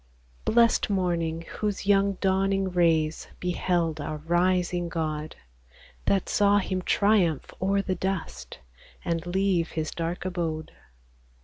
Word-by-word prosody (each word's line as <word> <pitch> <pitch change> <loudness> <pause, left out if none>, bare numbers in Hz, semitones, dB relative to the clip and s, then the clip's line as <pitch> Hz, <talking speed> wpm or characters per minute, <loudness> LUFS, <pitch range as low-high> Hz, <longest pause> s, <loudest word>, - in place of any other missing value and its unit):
Blest 230 -1 +3
morning, 170 -4 -1
whose 210 -2 -3
young 200 0 +3
dawning 195 0 +1
rays 165 -3 +1
Beheld 175 -3 0
our 155 +1 -4
rising 175 +2 +1
God! 155 -2 -3 0.7
That 195 -2 +1
saw 205 0 +3
Him 185 -2 -1
triumph 190 -6 +2
o'er 195 +1 +1
the 190 - -1
dust, 160 - -4 0.5
And 165 -1 -1
leave 185 -2 +1
His 155 -1 -2
dark 170 +2 -4
abode. 165 -4 -3
180 Hz, 115 wpm, -26 LUFS, 165-195 Hz, 0.7 s, Blest